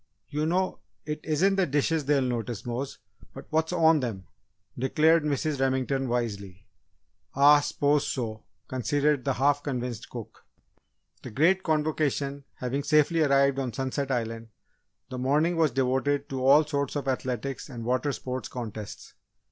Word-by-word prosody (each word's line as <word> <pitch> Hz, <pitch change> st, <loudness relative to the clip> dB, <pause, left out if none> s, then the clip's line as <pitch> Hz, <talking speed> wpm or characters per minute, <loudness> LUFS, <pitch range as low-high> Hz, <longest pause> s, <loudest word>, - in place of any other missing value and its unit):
"You 150 Hz, +2 st, -1 dB
know, 185 Hz, +3 st, 0 dB, 0.3 s
it 150 Hz, 0 st, -3 dB
isn't 185 Hz, +6 st, +1 dB
the 190 Hz, -, +2 dB
dishes 150 Hz, +2 st, 0 dB
they'll 140 Hz, -1 st, +2 dB
notice, 120 Hz, -4 st, -3 dB
Mose, 125 Hz, +3 st, -4 dB, 0.4 s
but -, -, -9 dB
what's 160 Hz, +1 st, +1 dB
on 165 Hz, -3 st, +4 dB
them!" 110 Hz, -8 st, -4 dB, 0.5 s
declared 155 Hz, +6 st, +3 dB
Mrs. 150 Hz, 0 st, -1 dB
Remington 135 Hz, 0 st, 0 dB
wisely. 100 Hz, -5 st, -3 dB, 0.7 s
"Ah 145 Hz, +2 st, +7 dB
s'pose 145 Hz, 0 st, +1 dB
so!" 115 Hz, -6 st, -4 dB, 0.2 s
conceded 140 Hz, +3 st, 0 dB
the 135 Hz, -, 0 dB
half 140 Hz, +3 st, +2 dB
convinced 125 Hz, -4 st, -4 dB
cook. 120 Hz, -3 st, -9 dB, 0.8 s
The -, -, -8 dB
Great 170 Hz, -, +3 dB
Convocation 150 Hz, -4 st, -1 dB
having 130 Hz, +3 st, -2 dB
safely 155 Hz, +3 st, +3 dB
arrived 140 Hz, -2 st, +3 dB
on 130 Hz, -4 st, -3 dB
Sunset 135 Hz, +1 st, -2 dB
Island, 115 Hz, -2 st, -2 dB, 0.6 s
the 130 Hz, -, -5 dB
morning 150 Hz, +7 st, +2 dB
was 160 Hz, -2 st, +3 dB
devoted 135 Hz, +2 st, 0 dB
to 130 Hz, -1 st, -3 dB
all 150 Hz, +3 st, +7 dB
sorts 140 Hz, -2 st, -2 dB
of 140 Hz, -2 st, -3 dB
athletics 130 Hz, +1 st, -3 dB
and 120 Hz, -4 st, -7 dB
water 130 Hz, +4 st, 0 dB
sport 130 Hz, -1 st, -5 dB
contests. 110 Hz, -4 st, -7 dB
140 Hz, 145 wpm, -27 LUFS, 125-150 Hz, 0.8 s, Ah